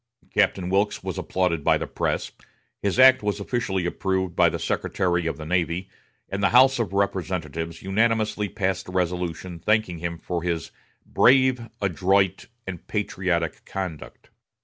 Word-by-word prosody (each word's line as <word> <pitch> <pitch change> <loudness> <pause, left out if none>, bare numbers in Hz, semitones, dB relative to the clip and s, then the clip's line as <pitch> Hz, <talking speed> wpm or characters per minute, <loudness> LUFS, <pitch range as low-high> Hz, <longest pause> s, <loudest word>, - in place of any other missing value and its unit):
Captain 90 -2 +2
Wilkes 100 +2 +1
was - - -4
applauded 90 -5 -1
by - - +4
the - - -4
press; - - -2 0.5
his 100 +1 0
act 130 0 +7
was 105 0 -1
officially 100 -4 -2
approved 95 0 -1
by - - +5
the - - -3
Secretary 85 -2 -1
of 80 - -2
the 80 - -7
Navy, 90 +2 -1 0.4
and 100 +1 -4
the 100 - +4
House 130 +1 +6
of 110 -6 -1
Representatives 85 -5 -2
unanimously 105 +1 +1
passed 95 +1 -2
a - - -7
resolution 90 -1 -2
thanking 110 -3 +1
him 85 0 -4
for 85 0 -4
his 85 -3 -3 0.3
"brave, 130 -2 +3
adroit, 95 0 +1 0.2
and 90 -3 -7
patriotic 90 -5 -1
conduct." 90 -6 -7
95 Hz, 150 wpm, -24 LUFS, 85-105 Hz, 0.5 s, act